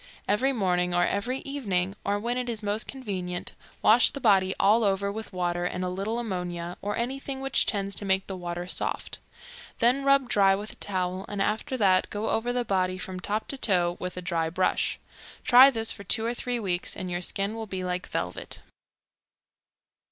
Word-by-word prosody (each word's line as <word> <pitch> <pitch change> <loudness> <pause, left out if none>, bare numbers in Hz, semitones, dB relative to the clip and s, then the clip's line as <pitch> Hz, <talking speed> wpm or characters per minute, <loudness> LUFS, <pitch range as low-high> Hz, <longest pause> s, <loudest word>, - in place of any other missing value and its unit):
Every 250 +7 +2
morning 180 -6 +1
or 175 0 +4
every 245 +6 -1
evening, 195 -9 -2
or 200 +1 0
when 235 +3 -2
it 250 -1 -2
is 225 -2 -4
most 210 +2 0
convenient, 185 -9 -4 0.3
wash 230 +3 +6
the 280 - -7
body 190 -6 +3
all 220 +4 +4
over 200 0 +1
with 220 +1 -7
water 175 -1 -1
and 180 +1 -2
a - - -1
little 195 +5 -2
ammonia, 180 -6 -4
or 205 +1 -2
anything 265 +3 -3
which 270 0 +2
tends 200 -2 0
to - - -1
make 190 0 +2
the 195 - -5
water 175 -1 -5
soft; 180 - -3 0.6
then 250 +4 +3
rub 275 -1 +4
dry 195 -3 +4
with 205 +2 -5
a - - -13
towel, 185 -1 -2
and 205 - -4
after 215 +6 -1
that 190 -5 +3
go 210 +2 -2
over 235 +2 0
the 245 -1 -1
body 185 -2 0
from 185 0 -6
top 210 +3 -2
to 275 - -3
toe 175 -6 +2
with 180 0 -5
a 180 - -5
dry 165 -2 0
brush. 185 +2 0 0.5
Try 255 +2 +9
this 225 -4 +1
for 200 - -7
two 220 +2 +1
or 235 - 0
three 245 0 -2
weeks, 185 -4 -2
and 185 -1 -4
your 175 0 -2
skin 195 +3 -1
will 225 -1 -5
be 190 -2 -4
like 180 0 -3
velvet. 90 +1 -4
200 Hz, 195 wpm, -27 LUFS, 180-230 Hz, 0.6 s, Try